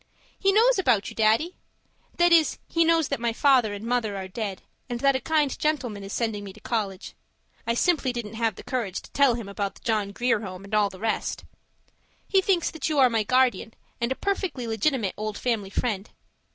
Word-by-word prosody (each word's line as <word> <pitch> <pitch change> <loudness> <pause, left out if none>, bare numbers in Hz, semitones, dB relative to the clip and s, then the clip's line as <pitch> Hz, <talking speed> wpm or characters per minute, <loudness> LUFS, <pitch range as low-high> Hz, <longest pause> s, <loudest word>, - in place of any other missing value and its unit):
He 390 - +3
knows 455 +2 +4
about 240 - +2
you, - - -12
Daddy. 225 +11 +2 0.6
That 345 0 +4
is, 330 -2 +4
he 335 - +2
knows 330 -2 +3
that - - -1
my 235 -1 0
father 255 -4 +4
and 205 +2 -6
mother 230 -4 -1
are 190 -1 -5
dead, 195 -1 -5 0.3
and 240 -1 -3
that 275 -1 +4
a 260 - -1
kind 300 -1 +1
gentleman 260 -9 -1
is 195 - -8
sending 220 -3 -2
me 200 - -8
to 215 - -15
college; 205 -4 -3 0.5
I 230 - +1
simply 300 -2 +2
didn't 235 -3 -5
have 225 -2 0
the - - -10
courage 225 -8 -3
to - - -15
tell 275 -4 +4
him 230 -4 -6
about 200 0 -3
the - - -17
John 215 -4 0
Grier 240 +2 +1
Home 190 -3 -7
and 200 +2 -12
all 210 -1 +3
the 190 - -12
rest. 225 0 -2 0.8
He 385 -1 +4
thinks 370 -3 +1
that 320 - -3
you 305 - -1
are 260 -3 +5
my 225 -1 +2
guardian 245 -2 +1 0.3
and 235 +2 0
a - - +1
perfectly 380 -10 -2
legitimate 225 -1 0
old 215 0 -4
family 225 -6 -1
friend. 200 -1 -2
235 Hz, 210 wpm, -25 LUFS, 210-280 Hz, 0.8 s, are